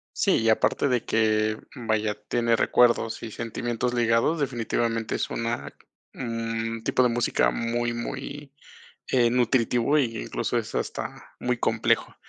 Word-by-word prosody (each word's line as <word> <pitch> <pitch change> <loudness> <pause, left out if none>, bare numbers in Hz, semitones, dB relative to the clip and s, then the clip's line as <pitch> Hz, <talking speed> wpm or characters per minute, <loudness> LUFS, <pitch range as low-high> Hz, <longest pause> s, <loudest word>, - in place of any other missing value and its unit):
Sí, - - +3
y 115 - +2
aparte 110 +5 +2
de 125 -3 0
que, 110 -1 +2 0.2
vaya, 110 -3 -1
tiene 115 -1 +2
recuerdos 120 -1 +3
y 110 - -6
sentimientos 120 +2 -3
ligados, 120 +7 +2
definitivamente 115 -4 -1
es - - -2
una 115 +1 -3 0.4
un 115 -2 -3
tipo - - +2
de - - +5
música 115 - +2
muy 120 - -1
muy, 135 +4 -6 0.6
eh, 120 -2 +3
nutritivo, 125 +2 +2
y 115 -4 0
incluso - - -2
es - - -3
hasta - - -5
muy 125 0 0
complejo. 115 -1 +1
115 Hz, 135 wpm, -26 LUFS, 115-125 Hz, 0.6 s, de